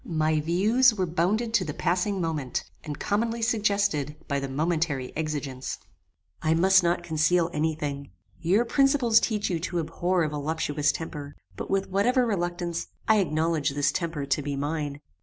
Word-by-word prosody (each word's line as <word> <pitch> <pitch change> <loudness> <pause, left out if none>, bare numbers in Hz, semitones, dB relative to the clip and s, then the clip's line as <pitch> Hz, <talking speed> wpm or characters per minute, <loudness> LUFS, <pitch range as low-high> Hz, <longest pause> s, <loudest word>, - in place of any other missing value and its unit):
My 155 -1 +1
views 215 +10 +3
were 190 -3 0
bounded 190 +8 0
to 210 - +3
the 150 -4 -5
passing 185 +3 0
moment, 155 -7 -2 0.2
and 145 -1 -5
commonly 230 +3 -1
suggested 200 - +1
by 140 -2 0
the 135 0 -4
momentary 150 -2 -1
exigence. 145 -4 -3 0.6
"I 160 0 +2
must 190 +3 +5
not 175 0 0
conceal 165 +2 +2
any 155 +1 0
thing. 140 -2 -5 0.3
Your 195 +8 +2
principles 270 -3 +4
teach 210 -4 -1
you 170 - 0
to 175 +1 -3
abhor 170 +2 0
a 155 - 0
voluptuous 150 0 0
temper; 145 -3 -7 0.2
but, - - -6
with 195 0 0
whatever 245 +6 +3
reluctance, 175 -4 -2 0.2
I 220 -1 +5
acknowledge 160 -4 +1
this 145 0 +2
temper 165 -5 -3
to 140 +2 0
be 140 0 -3
mine. 145 0 -3
165 Hz, 160 wpm, -26 LUFS, 150-195 Hz, 0.6 s, must